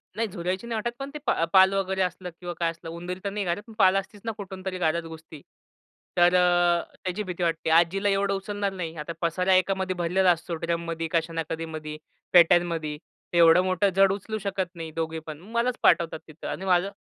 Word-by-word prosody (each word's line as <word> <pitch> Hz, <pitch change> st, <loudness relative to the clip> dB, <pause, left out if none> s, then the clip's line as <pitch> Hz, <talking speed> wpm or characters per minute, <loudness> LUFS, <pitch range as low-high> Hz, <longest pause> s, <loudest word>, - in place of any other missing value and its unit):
नाही 225 Hz, +1 st, 0 dB
झुरळांची 185 Hz, +2 st, -4 dB
नाही 235 Hz, -, -3 dB
वाटत, 235 Hz, +2 st, -2 dB
पण 275 Hz, 0 st, -5 dB
ते 300 Hz, -, -6 dB
पा 165 Hz, -, +1 dB
पाल 190 Hz, 0 st, +7 dB
वगैरे 190 Hz, -1 st, -1 dB
असलं 180 Hz, 0 st, -2 dB
किंवा 175 Hz, -1 st, -5 dB
काय 170 Hz, -1 st, +2 dB
असलं 165 Hz, 0 st, -10 dB
उंदीर 175 Hz, +2 st, -6 dB
तर 200 Hz, -, -1 dB
नाही 205 Hz, 0 st, -3 dB
घरात, 175 Hz, +4 st, -2 dB
पण 225 Hz, -, -12 dB
पाल 190 Hz, -1 st, +6 dB
असतीच 195 Hz, +1 st, -5 dB
ना 225 Hz, -, -1 dB
कुठूनतरी 190 Hz, -2 st, -6 dB
घरात 170 Hz, -1 st, 0 dB
घुसती. 160 Hz, -2 st, -11 dB, 0.8 s
तर 175 Hz, +1 st, +5 dB
अ, 175 Hz, -1 st, +3 dB, 0.2 s
त्याची 185 Hz, +3 st, -2 dB
भीती 180 Hz, -2 st, -4 dB
वाटते. 165 Hz, -1 st, 0 dB
आजीला 175 Hz, +5 st, +3 dB
एवढं 195 Hz, 0 st, +1 dB
उचलणार 200 Hz, 0 st, -2 dB
नाही. 170 Hz, -3 st, -5 dB
आता 150 Hz, +2 st, -5 dB
पसारा 180 Hz, +3 st, +1 dB
एकामध्ये 185 Hz, 0 st, +1 dB
भरलेला 180 Hz, +2 st, +3 dB
असतो. 170 Hz, 0 st, -2 dB
ड्रममधी, 170 Hz, -1 st, -2 dB
कशा 165 Hz, 0 st, 0 dB
ना 165 Hz, 0 st, -1 dB
कशा 165 Hz, 0 st, -4 dB
मधी, 155 Hz, -1 st, -6 dB, 0.4 s
पेट्यांमध्ये. 170 Hz, -3 st, +4 dB, 0.4 s
एवढं 170 Hz, 0 st, +6 dB
मोठं 185 Hz, +2 st, +2 dB
जड 195 Hz, 0 st, +5 dB
उचलू 205 Hz, +2 st, -4 dB
शकत 190 Hz, -2 st, -3 dB
नाही 165 Hz, -1 st, -6 dB
दोघीपण, 160 Hz, -2 st, -4 dB
मलाच 235 Hz, +1 st, 0 dB
पाठवतात 165 Hz, -2 st, +3 dB
तिथं 155 Hz, 0 st, -9 dB
आणि 190 Hz, -, -4 dB
माझं 185 Hz, +1 st, +2 dB
180 Hz, 195 wpm, -26 LUFS, 165-195 Hz, 0.8 s, पाल